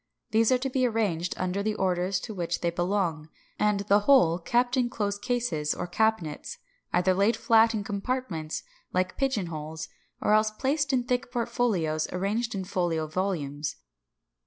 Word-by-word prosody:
These 225 +2 +4
are 255 - +5
to 265 +2 -2
be 255 -1 +2
arranged 195 -7 -1
under 185 +2 -1
the 215 +1 -1
orders 185 0 0
to 220 - -6
which 170 -3 -2
they 170 - +1
belong, 175 -3 -1 0.3
and 210 -1 +2
the 200 0 +4
whole 205 -8 +5
kept 245 +8 +1
in 250 -2 +2
closed 205 -4 -2
cases 230 - -1
or - - -3
cabinets, 220 - -1 0.3
either 180 +1 +3
laid 200 +4 +2
flat 225 0 +4
in 210 - -2
compartments, 200 -6 -3 0.3
like 185 0 0
"pigeon 265 -8 0
holes," 160 -1 -6 0.3
or 210 - +2
else 215 0 +4
placed 275 +6 0
in 255 -2 +2
thick 245 0 -1
portfolios, 195 -10 0
arranged 210 +6 -1
like 190 -1 -3
folio 175 -3 0
volumes. 155 -4 -2
200 Hz, 160 wpm, -27 LUFS, 175-235 Hz, 0.3 s, are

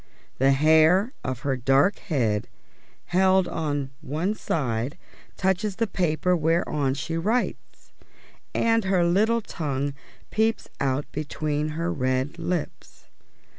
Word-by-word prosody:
The 135 +1 +5
hair 160 - +4
of 130 0 -3
her 140 -2 0
dark 135 - +3
head, 115 - 0 0.7
held 190 0 +4
on 145 -5 -2
one 160 +7 -1
side, 130 - -2 0.4
touches 190 +1 0
the 230 - +1
paper 180 -2 +1
whereon 150 -4 +1
she 165 +4 -3
writes, 220 +9 -2 0.6
and 225 -2 +2
her 185 -2 +3
little 215 +7 +3
tongue 145 -7 -3 0.4
peeps 220 +1 +1
out 140 +1 0
between 150 0 -2
her 170 +1 -1
red 130 +2 -1
lips. 175 -3 -5
160 Hz, 115 wpm, -25 LUFS, 140-190 Hz, 0.7 s, The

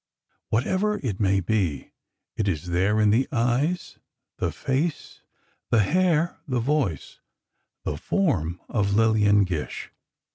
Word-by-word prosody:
Whatever 190 - +1
it 105 -7 -2
may 95 -1 +2
be, 90 -8 -1 0.4
it 110 - -1
is 90 -2 -2
there 95 +5 +2
in 105 -1 +4
the 120 +5 +2
eyes, 130 +8 0 0.4
the - - 0
face, 145 +4 -2 0.5
the 110 -2 +4
hair, 170 - +1
the 130 -3 0
voice, 120 - -1 0.6
the 75 - -3
form 90 - 0
of 100 -3 0
Lillian 105 -2 +4
Gish. 85 -6 -4
110 Hz, 120 wpm, -25 LUFS, 95-145 Hz, 0.6 s, in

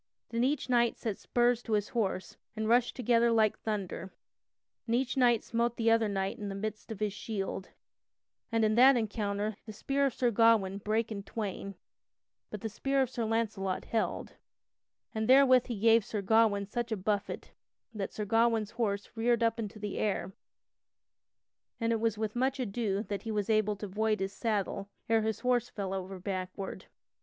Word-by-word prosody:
Then 230 +1 0
each 280 +2 0
knight 240 -2 +2
set 215 -4 -3
spurs 240 -1 +2
to 225 - -4
his 205 -1 +1
horse 195 -5 -2 0.2
and 220 0 -2
rushed 240 +1 +3
together 235 -1 +3
like 220 -2 +3
thunder, 195 -4 -4 0.8
and 230 - +1
each 260 +2 0
knight 240 -4 +4
smote 235 +1 -1
the 225 -1 +3
other 225 -1 +4
knight 195 -1 -2
in 205 -1 -4
the 195 - -5
midst 215 +2 -5
of 215 - -6
his 210 -2 -1
shield; 195 -3 -4 0.8
and 225 -1 +3
in 215 - +2
that 255 +3 +7
encounter 210 -1 -2
the - - -5
spear 275 +6 0
of 260 - -4
Sir 245 -2 +2
Gawain 215 -3 +4
brake 220 +2 -1
in 205 -2 -4
twain 200 -1 -5 0.7
but 210 - -7
the - - -2
spear 270 +5 0
of 255 - -4
Sir 235 -3 -2
Launcelot 215 -4 -1
held, 225 - -2 0.8
and 220 0 -1
therewith 260 -2 +6
he 235 -4 -3
gave 225 +1 +5
Sir 205 0 -4
Gawain 215 -1 +3
such 235 +3 -4
a 220 - 0
buffet 205 +1 -2 0.4
that 200 -3 -4
Sir 210 - -4
Gawain's 225 0 +2
horse 205 -4 -1
reared 235 +1 +2
up 230 0 +1
into 215 -1 -5
the 210 -1 -4
air, 200 -2 -1 1.5
and 230 -1 +1
it 225 - 0
was 225 -1 0
with 215 0 -3
much 260 +2 0
ado 210 -3 -1
that 200 -3 -4
he 225 - -7
was 210 0 0
able 215 -1 +2
to 205 - -6
void 215 +2 0
his 195 +1 -2
saddle 200 -3 -2 0.2
ere 225 0 +3
his 220 0 -2
horse 250 -2 +1
fell 195 -2 -4
over 190 0 -5
backward. 185 0 -5
220 Hz, 185 wpm, -31 LUFS, 200-235 Hz, 1.5 s, that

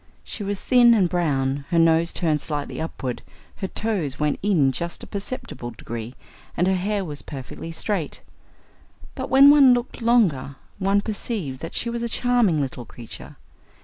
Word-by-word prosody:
She - - -7
was 200 0 -2
thin 240 -2 +5
and 195 -5 +3
brown, 140 -6 -1
her 170 - +1
nose 165 0 +4
turned 155 -4 0
slightly 150 0 -4
upward, 130 -6 -4 0.4
her 190 - -3
toes 190 -11 -2
went 150 -1 0
in 170 -10 +3
just 170 +7 -5
a - - -6
perceptible 200 - -5
degree, 115 +1 -7 0.4
and 175 - +2
her 190 - +2
hair 195 +2 -1
was 145 -3 -5
perfectly 140 +3 -8
straight. 165 -2 -3 0.9
But 260 -1 -5
when 275 +2 +8
one 275 -4 +7
looked 245 0 -5
longer, 195 - +2 0.2
one 195 +1 +2
perceived 200 - -3
that 165 - -7
she 235 - -2
was 235 0 -3
a 235 - -2
charming 240 -9 +2
little 130 -3 -3
creature. 115 0 -11
175 Hz, 165 wpm, -23 LUFS, 145-225 Hz, 0.9 s, when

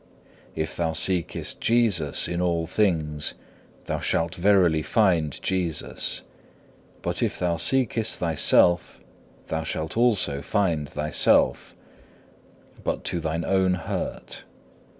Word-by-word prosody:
If 80 0 -3
thou 80 -2 -1
seekest 85 +1 -1
Jesus 110 -11 +2
in 90 0 -2
all 85 -2 0
things 80 -6 0 0.5
thou - - -2
shalt 85 0 -1
verily 90 -4 +3
find 85 -6 +1
Jesus, 90 -4 -1 0.8
but - - -2
if - - 0
thou 85 -2 0
seekest 115 +2 +1
thyself 85 +1 +2 0.5
thou 80 - -1
shalt 80 0 -4
also 105 -12 +2
find 80 -5 0
thyself, 75 +1 +1 1.1
but - - -2
to 85 - -1
thine 80 +1 -2
own 95 -1 +2
hurt. 85 - -5
85 Hz, 110 wpm, -25 LUFS, 80-95 Hz, 1.1 s, verily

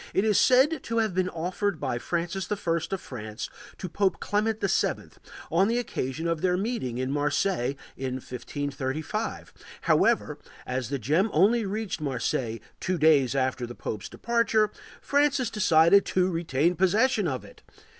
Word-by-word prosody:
It 195 - +3
is 215 -2 +4
said 270 +5 +4
to 230 - -2
have 220 -4 +1
been 185 0 +1
offered 180 +2 -2
by 120 - -2
Francis 175 - -3
I - - +2
of 170 0 -2
France 110 -7 -7 0.3
to 185 - -5
Pope 190 0 0
Clement 215 +1 0
VII, - - 0 0.4
on 190 +4 +4
the 230 +2 +1
occasion 160 - -3
of 165 -2 -1
their 180 -1 +2
meeting 195 - -2
in 130 +1 -2
Marseilles 145 -1 0 0.2
in 130 -1 -3
1535; 135 +3 -4 0.3
however, - - +2 0.3
as 125 -1 -3
the 140 - -1
gem 155 - +1
only 205 +7 +3
reached 210 -4 -3
Marseilles 120 -4 -2 0.2
two 185 0 -1
days 145 -5 +4
after 130 -2 0
the 120 - -9
pope's 105 -3 -5
departure, 230 -2 +1 0.3
Francis 285 -3 +2
decided 200 -2 +5
to 185 0 +1
retain 165 0 +1
possession 210 +3 +2
of 130 -4 -3
it. - - -16
175 Hz, 155 wpm, -27 LUFS, 135-210 Hz, 0.4 s, decided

